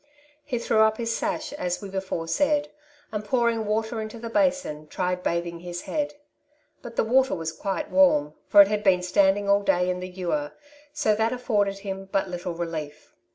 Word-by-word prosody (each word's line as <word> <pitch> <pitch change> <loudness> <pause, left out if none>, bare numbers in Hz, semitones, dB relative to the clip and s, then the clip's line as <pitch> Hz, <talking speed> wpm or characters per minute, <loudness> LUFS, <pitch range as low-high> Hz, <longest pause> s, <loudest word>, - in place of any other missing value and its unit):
He 255 -4 -3
threw 230 -1 +1
up 220 0 +4
his 230 -1 -1
sash, 310 0 -2
as 180 -10 -2
we 200 - -7
before 190 -4 -4
said, 290 - +1 0.4
and 210 -1 -3
pouring 230 0 +1
water 220 +1 -1
into 215 +1 -6
the 230 0 -7
basin, 275 - 0
tried 180 +2 -2
bathing 170 -1 -2
his 175 0 -6
head; 295 -1 -2 0.7
but 235 -1 -9
the - - +2
water 260 +4 +3
was 165 -1 -3
quite 195 - -4
warm, 150 - +4
for 200 - +9
it - - -2
had 210 0 -1
been 185 -2 +4
standing 195 +2 +3
all 200 0 +4
day 180 -2 +2
in 180 - -3
the 185 0 -6
ewer, 175 -5 -3 0.4
so 220 -7 +1
that 220 +2 +1
afforded 210 -6 0
him 195 -1 -6
but 195 -1 +1
little 175 -1 -4
relief. 155 -3 -6
200 Hz, 190 wpm, -25 LUFS, 180-230 Hz, 0.7 s, for